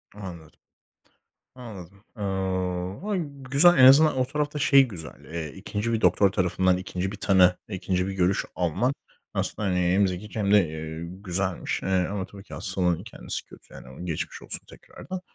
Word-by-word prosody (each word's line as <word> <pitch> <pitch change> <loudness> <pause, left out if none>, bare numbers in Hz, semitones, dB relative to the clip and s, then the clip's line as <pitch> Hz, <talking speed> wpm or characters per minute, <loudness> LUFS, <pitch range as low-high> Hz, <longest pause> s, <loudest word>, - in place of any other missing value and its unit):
Anladım, 90 -6 -10 1.0
anladım. 100 -6 -11
Eee, 95 -2 -2
ha, 210 - +1 0.3
güzel, 170 +6 +6
en 130 - +8
azından 140 +2 +7
o 130 - +2
tarafta 150 +2 -2
şey 140 -1 +6
güzel, 80 - -10
eee, 80 -3 -5
2'nci 110 +3 -3
bir 110 - 0
doktor 90 +2 +4
tarafından 95 -1 +2
2'nci 95 0 -3
bir 105 - -7
tanı, 95 -2 +4
2'nci 95 -1 -1
bir 95 - -3
görüş 95 0 +1
alman 90 - 0 0.4
aslında, 105 - -2
hani, 90 -1 +1
hem 90 +3 +3
zekice 95 +4 -5
hem 100 -1 +1
de, 100 -5 +5
eee, 80 +1 -6
güzelmiş, 95 0 -3
eee, 95 -1 +1
ama 100 -2 -3
tabii 100 +1 -13
ki - - -13
hastalığın 90 -2 -1
kendisi 115 - -6
kötü - - -17
yani 65 +7 -10
geçmiş 80 -4 -4
olsun - - -6
tekrardan. 185 0 -9
95 Hz, 165 wpm, -26 LUFS, 90-105 Hz, 1.0 s, en